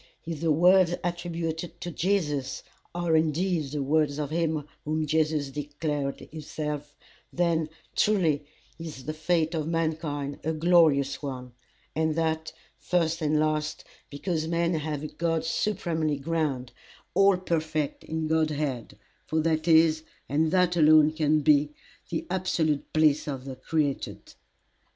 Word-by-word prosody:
If 160 -2 -5
the 165 -1 +2
words 175 +2 +5
attributed 170 -1 -3
to 175 - -4
Jesus 150 -8 -1 0.3
are 175 -2 +1
indeed 160 +1 +1
the 145 0 -2
words 150 0 +1
of 150 -1 -3
him 160 -3 -1 0.2
whom 155 +1 -1
Jesus 155 -2 0
declared 145 -1 -3
himself, 150 -1 -5 0.4
then 165 -2 +1 0.3
truly 170 -9 +2 0.4
is 155 -6 -8
the 155 - -3
fate 160 +1 0
of 155 -2 -2
mankind 155 -3 -2
a 160 +2 0
glorious 155 -4 +3
one, 130 -3 -6 0.4
and 160 0 +1
that, 160 -1 -1 0.3
first 165 -2 0
and 155 0 +2
last, 155 0 -1 0.3
because 160 +2 -2
men 170 +1 +1
have 155 -2 -3
a - - -3
God 165 +1 -1
supremely 165 -5 0
grand, 140 -4 -2 0.4
all 195 0 +5
perfect 155 -4 -2
in 160 0 -3
God 160 0 +2
head; 145 -6 -3 0.3
for 160 - 0
that 155 0 0
is, 160 -1 +5 0.3
and 155 +4 +1
that 180 0 +2
alone 155 -1 +6
can 155 -1 +2
be, 150 0 +3 0.3
the 165 - -3
absolute 175 -5 0
bliss 155 -2 +3
of 135 -3 -4
the 135 -1 -6
created." 145 -1 -2
155 Hz, 135 wpm, -27 LUFS, 150-165 Hz, 0.4 s, alone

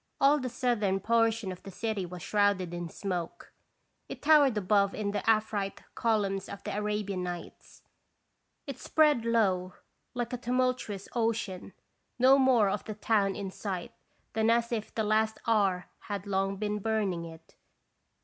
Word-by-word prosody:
All 285 +2 +5
the 255 -2 -3
southern 230 -6 0
portion 225 -1 +1
of 180 - -9
the 200 - -10
city 200 -1 -3
was 175 -1 -8
shrouded 205 -4 +1
in 175 -1 -4
smoke, 180 -2 -5 0.6
it - - -8
towered 290 -6 +5
above 200 0 +2
in 205 -1 -2
the 205 - -2
Afrite 215 -3 0
columns 200 -4 0
of 200 - -8
the - - -4
Arabian 210 -2 -2
Nights, 175 -1 -8 0.8
it 275 -3 -7
spread 300 -7 +3
low 190 -6 +1 0.4
like 240 0 -3
a - - -1
tumultuous 250 -5 -1
ocean, 225 -5 -2 0.4
no 260 +2 +6
more 255 -6 +4
of 195 +1 -1
the 215 - -5
town 205 -2 +1
in 195 -2 -5
sight 190 -3 -5 0.4
than 220 +1 +2
as 235 0 +2
if 220 -2 -3
the 220 - 0
Last 220 +1 +1
Hour 195 -6 +2
had 200 -2 -5
long 195 0 0
been 210 +1 -2
burning 205 -5 -1
it. 165 0 -13
210 Hz, 155 wpm, -29 LUFS, 195-230 Hz, 0.8 s, no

